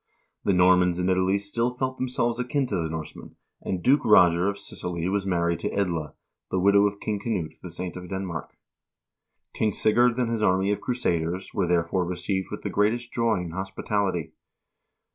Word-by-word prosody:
The 100 Hz, -, +2 dB
Normans 90 Hz, -1 st, +4 dB
in 90 Hz, +1 st, 0 dB
Italy 95 Hz, +1 st, +2 dB
still 110 Hz, +4 st, -1 dB
felt 130 Hz, +1 st, -3 dB
themselves 125 Hz, -2 st, -1 dB
akin 130 Hz, +3 st, 0 dB
to 110 Hz, -, -3 dB
the 80 Hz, -3 st, -1 dB
Norsemen, 80 Hz, -1 st, -7 dB, 0.3 s
and 90 Hz, -2 st, -3 dB
Duke 140 Hz, +3 st, +4 dB
Roger 90 Hz, -2 st, +5 dB
of 100 Hz, -, -4 dB
Sicily 90 Hz, -3 st, -4 dB
was 100 Hz, 0 st, -1 dB
married 85 Hz, -2 st, +1 dB
to -, -, -2 dB
Edla, 85 Hz, -7 st, -2 dB, 0.3 s
the 95 Hz, -, 0 dB
widow 100 Hz, +2 st, +5 dB
of 100 Hz, 0 st, -5 dB
King 105 Hz, -2 st, -2 dB
Knut 100 Hz, -7 st, -3 dB
the 90 Hz, -, -8 dB
Saint 90 Hz, 0 st, -5 dB
of 90 Hz, -1 st, -8 dB
Denmark. 95 Hz, -4 st, -5 dB, 1.0 s
King 105 Hz, -2 st, 0 dB
Sigurd 120 Hz, +4 st, +3 dB
and 120 Hz, -2 st, 0 dB
his 115 Hz, -2 st, -1 dB
army 95 Hz, 0 st, +2 dB
of 105 Hz, -, -2 dB
crusaders 90 Hz, -7 st, -2 dB
were, 95 Hz, -4 st, 0 dB
therefore, 85 Hz, +1 st, +1 dB
received 90 Hz, +2 st, -2 dB
with -, -, -7 dB
the -, -, -2 dB
greatest 115 Hz, +4 st, 0 dB
joy 115 Hz, -5 st, +1 dB
and 85 Hz, -2 st, -6 dB
hospitality. 95 Hz, -3 st, -2 dB
95 Hz, 180 wpm, -26 LUFS, 90-110 Hz, 1.0 s, Roger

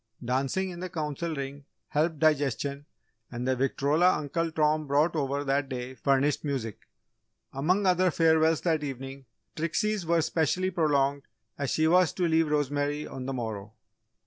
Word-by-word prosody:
Dancing 135 Hz, +10 st, -1 dB
in 175 Hz, -, -8 dB
the 185 Hz, +1 st, -5 dB
Council 160 Hz, 0 st, -3 dB
Ring 140 Hz, 0 st, -6 dB, 0.3 s
helped 155 Hz, +2 st, 0 dB
digestion 145 Hz, -2 st, 0 dB, 0.4 s
and 125 Hz, +1 st, -4 dB
the 130 Hz, -, +2 dB
victrola 145 Hz, +7 st, +2 dB
Uncle 165 Hz, +3 st, -2 dB
Tom 155 Hz, -1 st, +1 dB
brought 145 Hz, +5 st, +2 dB
over 140 Hz, -1 st, -1 dB
that 140 Hz, 0 st, 0 dB
day 125 Hz, -1 st, -5 dB
furnished 140 Hz, +2 st, +1 dB
music. 130 Hz, -8 st, -3 dB, 0.7 s
Among 180 Hz, +9 st, +1 dB
other 185 Hz, 0 st, +3 dB
farewells 160 Hz, -1 st, +3 dB
that 160 Hz, -3 st, 0 dB
evening, 135 Hz, 0 st, -6 dB, 0.3 s
Trixie's 190 Hz, +5 st, -1 dB
were 170 Hz, +1 st, +2 dB
especially 165 Hz, +3 st, 0 dB
prolonged 140 Hz, -4 st, +1 dB, 0.3 s
as 140 Hz, -2 st, -3 dB
she 155 Hz, +4 st, +2 dB
was 180 Hz, +1 st, +4 dB
to 180 Hz, -2 st, 0 dB
leave 160 Hz, -1 st, +2 dB
Rosemary 145 Hz, 0 st, 0 dB
on 130 Hz, -1 st, -7 dB
the 135 Hz, -, -2 dB
morrow. 110 Hz, -4 st, -5 dB
145 Hz, 150 wpm, -28 LUFS, 135-165 Hz, 0.7 s, was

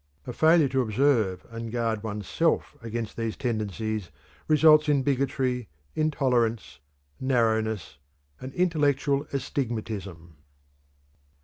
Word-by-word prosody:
A 125 Hz, -, -5 dB
failure 160 Hz, +2 st, +5 dB
to 130 Hz, 0 st, +1 dB
observe 110 Hz, -5 st, +1 dB
and 115 Hz, 0 st, -6 dB
guard 115 Hz, -2 st, -1 dB
one's 105 Hz, -3 st, -5 dB
self -, -, 0 dB
against 115 Hz, -1 st, -5 dB
these 115 Hz, -1 st, -3 dB
tendencies 110 Hz, -4 st, -3 dB, 0.4 s
results 155 Hz, -1 st, +6 dB
in 140 Hz, -2 st, +3 dB
bigotry, 130 Hz, -3 st, 0 dB, 0.3 s
intolerance, 125 Hz, -7 st, 0 dB, 0.4 s
narrowness, 110 Hz, -, 0 dB, 0.4 s
and 130 Hz, -, -7 dB
intellectual 145 Hz, -4 st, +1 dB
astigmatism. 110 Hz, -, -4 dB
120 Hz, 100 wpm, -26 LUFS, 110-140 Hz, 0.4 s, results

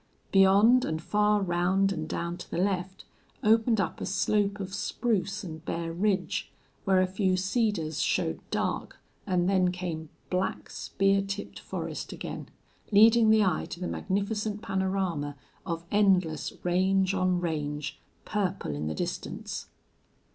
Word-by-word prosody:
Beyond, 200 Hz, +6 st, +6 dB
and 160 Hz, 0 st, -2 dB
far 210 Hz, +3 st, +2 dB
round 190 Hz, +2 st, +2 dB
and 160 Hz, -4 st, -4 dB
down 170 Hz, 0 st, -2 dB
to 180 Hz, -, -10 dB
the -, -, -3 dB
left, 185 Hz, 0 st, -1 dB, 0.4 s
opened 225 Hz, +1 st, +4 dB
up 185 Hz, -, -2 dB
a -, -, -2 dB
slope 205 Hz, +1 st, +1 dB
of 190 Hz, -1 st, -5 dB
spruce 210 Hz, -1 st, -1 dB
and 160 Hz, -3 st, -7 dB
bare 165 Hz, 0 st, -3 dB
ridge, 185 Hz, -1 st, 0 dB, 0.3 s
where 190 Hz, -1 st, +4 dB
a -, -, +3 dB
few 185 Hz, 0 st, +1 dB
cedars 190 Hz, -, 0 dB
showed -, -, 0 dB
dark, -, -, -2 dB, 0.3 s
and 180 Hz, -2 st, +2 dB
then 185 Hz, -2 st, +3 dB
came 170 Hz, -4 st, -5 dB, 0.2 s
black, 185 Hz, +1 st, -1 dB
spear 195 Hz, 0 st, +1 dB
tipped 200 Hz, +1 st, -5 dB
forest -, -, -5 dB
again, -, -, -6 dB, 0.4 s
leading 220 Hz, +2 st, +7 dB
the 220 Hz, -1 st, +6 dB
eye 185 Hz, -5 st, 0 dB
to 170 Hz, -, -7 dB
the 180 Hz, -, -3 dB
magnificent 205 Hz, +2 st, -2 dB
panorama 190 Hz, -7 st, -1 dB, 0.3 s
of 165 Hz, -1 st, -3 dB
endless 185 Hz, -6 st, +2 dB
range 190 Hz, +2 st, +2 dB
on 185 Hz, -2 st, +1 dB
range, 150 Hz, -3 st, -3 dB, 0.3 s
purple 195 Hz, -, -1 dB
in 75 Hz, +1 st, -3 dB
the 80 Hz, -, -2 dB
distance. -, -, -4 dB
190 Hz, 140 wpm, -28 LUFS, 175-200 Hz, 0.4 s, leading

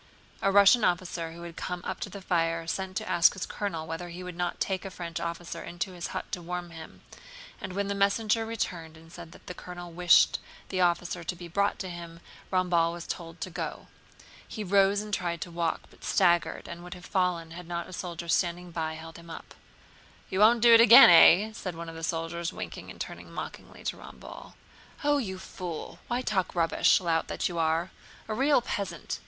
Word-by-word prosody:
A 195 Hz, -, +2 dB
Russian 200 Hz, +4 st, +6 dB
officer 175 Hz, -3 st, -1 dB
who 170 Hz, +1 st, -10 dB
had 170 Hz, -1 st, -8 dB
come 180 Hz, -1 st, -5 dB
up -, -, -4 dB
to -, -, -4 dB
the 195 Hz, 0 st, -9 dB
fire 165 Hz, -2 st, 0 dB
sent 185 Hz, +3 st, -3 dB
to -, -, -4 dB
ask 170 Hz, -1 st, +5 dB
his 190 Hz, -, -4 dB
colonel 165 Hz, -6 st, -4 dB
whether 165 Hz, +2 st, -5 dB
he 175 Hz, +2 st, -8 dB
would 180 Hz, -1 st, -7 dB
not 175 Hz, 0 st, -2 dB
take 190 Hz, -1 st, -1 dB
a 195 Hz, -, -5 dB
French 170 Hz, -2 st, -6 dB
officer 170 Hz, 0 st, -5 dB
into 175 Hz, +2 st, -4 dB
his 175 Hz, -1 st, -5 dB
hut -, -, -6 dB
to 185 Hz, -4 st, -3 dB
warm 175 Hz, 0 st, -5 dB
him, 160 Hz, -1 st, -11 dB, 0.6 s
and 185 Hz, -, -5 dB
when 200 Hz, +1 st, -1 dB
the 200 Hz, -, -1 dB
messenger 210 Hz, +3 st, +2 dB
returned 175 Hz, -8 st, -4 dB
and 165 Hz, +1 st, -16 dB
said 170 Hz, -1 st, -10 dB
that -, -, -16 dB
the 180 Hz, -, -6 dB
colonel 175 Hz, -1 st, -9 dB
wished 175 Hz, 0 st, +5 dB, 0.3 s
the 185 Hz, -1 st, -1 dB
officer 175 Hz, 0 st, +1 dB
to 180 Hz, -, -3 dB
be 175 Hz, 0 st, -9 dB
brought 200 Hz, +4 st, 0 dB
to 190 Hz, -, -5 dB
him, 170 Hz, -1 st, -8 dB, 0.3 s
Ramballe 175 Hz, -3 st, +2 dB
was 175 Hz, 0 st, -7 dB
told 165 Hz, -1 st, -6 dB
to 185 Hz, -, -4 dB
go. 165 Hz, -1 st, -5 dB, 0.6 s
He 215 Hz, -, -5 dB
rose 200 Hz, +1 st, +3 dB
and 210 Hz, 0 st, -8 dB
tried 175 Hz, -3 st, -1 dB
to 175 Hz, -, -5 dB
walk, 170 Hz, -1 st, -1 dB
but -, -, -20 dB
staggered 175 Hz, -3 st, +2 dB
and 170 Hz, 0 st, -8 dB
would 180 Hz, +1 st, -8 dB
have 180 Hz, 0 st, -12 dB
fallen 180 Hz, -3 st, 0 dB
had 170 Hz, 0 st, -9 dB
not 170 Hz, 0 st, -4 dB
a 185 Hz, -, -11 dB
soldier 170 Hz, -2 st, -6 dB
standing 175 Hz, +1 st, 0 dB
by 160 Hz, -1 st, -3 dB
held 165 Hz, +1 st, -10 dB
him 170 Hz, 0 st, -13 dB
up. 165 Hz, -, -9 dB, 0.8 s
"You 190 Hz, -, -1 dB
won't 225 Hz, +2 st, +6 dB
do 235 Hz, -1 st, +8 dB
it 230 Hz, -, +9 dB
again, 230 Hz, -5 st, +10 dB
eh?" 185 Hz, +5 st, +7 dB
said 185 Hz, -5 st, -5 dB
one 165 Hz, 0 st, -7 dB
of 165 Hz, -, -9 dB
the 165 Hz, -, -8 dB
soldiers, 165 Hz, +1 st, -2 dB
winking -, -, -7 dB
and -, -, -11 dB
turning -, -, -7 dB
mockingly -, -, -8 dB
to -, -, -3 dB
Ramballe. -, -, -11 dB, 0.5 s
"Oh, 290 Hz, 0 st, +3 dB
you 190 Hz, -7 st, -4 dB
fool! 180 Hz, -3 st, -7 dB
Why 245 Hz, +1 st, -1 dB
talk 190 Hz, -6 st, -1 dB
rubbish, 165 Hz, -1 st, +4 dB
lout 165 Hz, -3 st, 0 dB
that -, -, -1 dB
you 175 Hz, -2 st, -4 dB
are—a 165 Hz, +6 st, -3 dB
real 270 Hz, +3 st, +3 dB
peasant!" 200 Hz, -4 st, -4 dB
175 Hz, 210 wpm, -28 LUFS, 170-190 Hz, 0.8 s, again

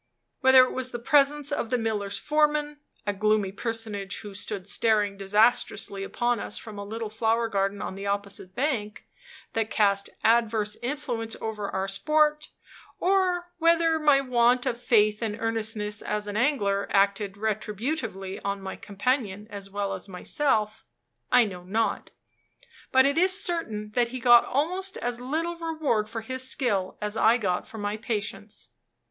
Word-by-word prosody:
Whether 260 Hz, -1 st, +7 dB
it 255 Hz, -, -1 dB
was 260 Hz, 0 st, -2 dB
the 240 Hz, -, -5 dB
presence 285 Hz, +3 st, +2 dB
of 235 Hz, -5 st, -2 dB
the 250 Hz, -, +1 dB
miller's 210 Hz, -3 st, -2 dB
foreman 300 Hz, +2 st, +1 dB, 0.3 s
a 205 Hz, -, 0 dB
gloomy 210 Hz, -1 st, +1 dB
personage, 210 Hz, -2 st, -3 dB
who 205 Hz, -2 st, -9 dB
stood 195 Hz, -1 st, -4 dB
staring 210 Hz, -2 st, +1 dB
disastrously 205 Hz, 0 st, +1 dB
upon 240 Hz, +3 st, 0 dB
us -, -, -5 dB
from 215 Hz, -2 st, -9 dB
a -, -, -4 dB
little 220 Hz, +2 st, -5 dB
flower 225 Hz, +2 st, 0 dB
garden 195 Hz, -2 st, -1 dB
on -, -, -4 dB
the 195 Hz, +1 st, -6 dB
opposite 200 Hz, -2 st, -3 dB
bank 235 Hz, -6 st, -2 dB, 0.5 s
that 225 Hz, -1 st, -1 dB
cast 200 Hz, -2 st, +2 dB
adverse 220 Hz, -2 st, +2 dB
influence 240 Hz, -4 st, -3 dB
over 210 Hz, -2 st, -4 dB
our 190 Hz, 0 st, -2 dB
sport; 300 Hz, +9 st, +1 dB, 0.5 s
or 360 Hz, -2 st, +1 dB
whether 330 Hz, -1 st, +3 dB
my 295 Hz, -3 st, +4 dB
want 245 Hz, -1 st, +3 dB
of 235 Hz, 0 st, -2 dB
faith 215 Hz, -3 st, +3 dB
and 220 Hz, -2 st, -2 dB
earnestness 220 Hz, -2 st, -2 dB
as 210 Hz, 0 st, -3 dB
an 205 Hz, 0 st, -5 dB
angler 210 Hz, -6 st, +1 dB
acted 200 Hz, 0 st, +2 dB
retributively 215 Hz, -1 st, -3 dB
on 200 Hz, 0 st, -2 dB
my 190 Hz, -1 st, -6 dB
companion 210 Hz, -1 st, -2 dB
as 200 Hz, -1 st, -7 dB
well 200 Hz, 0 st, -2 dB
as 190 Hz, +1 st, -6 dB
myself, 215 Hz, +2 st, -1 dB, 0.5 s
I 250 Hz, -2 st, +6 dB
know 185 Hz, -4 st, -7 dB
not; 220 Hz, +5 st, -1 dB, 0.8 s
but 260 Hz, 0 st, +6 dB
it 280 Hz, +3 st, +2 dB
is 370 Hz, +2 st, +5 dB
certain 220 Hz, -, -2 dB
that 240 Hz, +2 st, +2 dB
he 255 Hz, +2 st, -6 dB
got 240 Hz, -1 st, +7 dB
almost 365 Hz, +8 st, -1 dB
as 245 Hz, 0 st, -3 dB
little 325 Hz, +6 st, -2 dB
reward 310 Hz, -10 st, -1 dB
for 225 Hz, 0 st, -5 dB
his 260 Hz, +3 st, -3 dB
skill 205 Hz, -9 st, 0 dB
as 210 Hz, +1 st, -3 dB
I 225 Hz, +2 st, +4 dB
got 185 Hz, -6 st, -1 dB
for 230 Hz, -, -10 dB
my 205 Hz, 0 st, -3 dB
patience. 215 Hz, -1 st, -5 dB
225 Hz, 160 wpm, -26 LUFS, 205-260 Hz, 0.8 s, Whether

